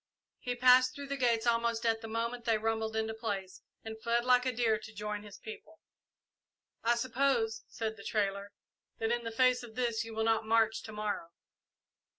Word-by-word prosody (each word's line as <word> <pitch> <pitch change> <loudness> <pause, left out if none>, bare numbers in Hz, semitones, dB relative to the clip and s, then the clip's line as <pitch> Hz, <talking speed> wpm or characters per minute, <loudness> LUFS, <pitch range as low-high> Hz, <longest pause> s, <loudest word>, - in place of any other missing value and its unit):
He 245 0 -3
passed 255 +1 +6
through 280 -1 -7
the 280 - -1
gates 240 -4 +1
almost 230 -1 +1
at 225 -1 +2
the 225 - -6
moment 230 +2 -3
they 225 -2 +3
rumbled 220 0 -1
into 220 0 -1
place, 200 -4 -4 0.2
and 220 0 -7
fled 235 +1 +1
like 250 0 +4
a - - +2
deer 225 -3 +1
to 220 0 -10
join 210 -1 -4
his 205 -1 -11
people. 225 +8 -11 1.0
"I 235 +1 +3
suppose," 235 -2 0
said 220 -1 -4
the 200 - -11
trader, 200 -1 -1 0.5
"that 225 0 -1
in 240 0 0
the 230 - -3
face 255 +2 +3
of 235 -3 -11
this 235 -3 0
you 225 -1 -8
will 220 - 0
not 225 0 +2
march 225 0 +2
to 220 - -8
morrow." 210 -5 -3
225 Hz, 190 wpm, -32 LUFS, 220-240 Hz, 1.0 s, passed